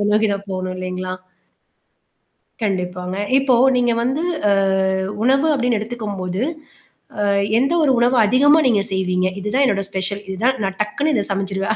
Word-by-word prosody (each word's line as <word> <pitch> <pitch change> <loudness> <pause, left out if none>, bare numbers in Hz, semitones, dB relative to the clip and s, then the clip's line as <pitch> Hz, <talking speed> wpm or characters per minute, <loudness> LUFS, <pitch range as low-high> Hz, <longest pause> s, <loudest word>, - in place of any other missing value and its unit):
அதை - - 0
நோக்கி 215 +1 +3
தான் 200 0 -7
போகணும், 185 0 -3
இல்லைங்களா? 185 0 -4 1.5
கண்டிப்பாங்க. 180 -2 -3 0.2
இப்போ 270 -2 +2 0.2
நீங்க 245 -1 +2
வந்து 265 +6 -1 0.3
அ - - +4 0.7
உணவு 270 +5 +3
அப்படின்னு 245 -4 0
எடுத்துக்கும் 215 -2 -5
போது, 185 +1 -3 0.9
அ - - +1 0.3
எந்த 275 +6 +1
ஒரு 285 - +3
உணவை 245 +2 +3
அதிகமா 290 +7 +4
நீங்க 210 -5 +2
செய்வீங்க. 185 -1 0
இதுதான் 250 +8 +1
என்னுடைய 195 -4 0
ஸ்பெஷல். 195 +1 -3
இது 190 0 -5
தான் 260 +1 +2
நான் 195 0 -4
டக்குன்னு 280 +9 -2
இதை - - +1
சமைடச்சுடுவேன். 195 +2 -2
205 Hz, 155 wpm, -19 LUFS, 190-250 Hz, 1.5 s, அ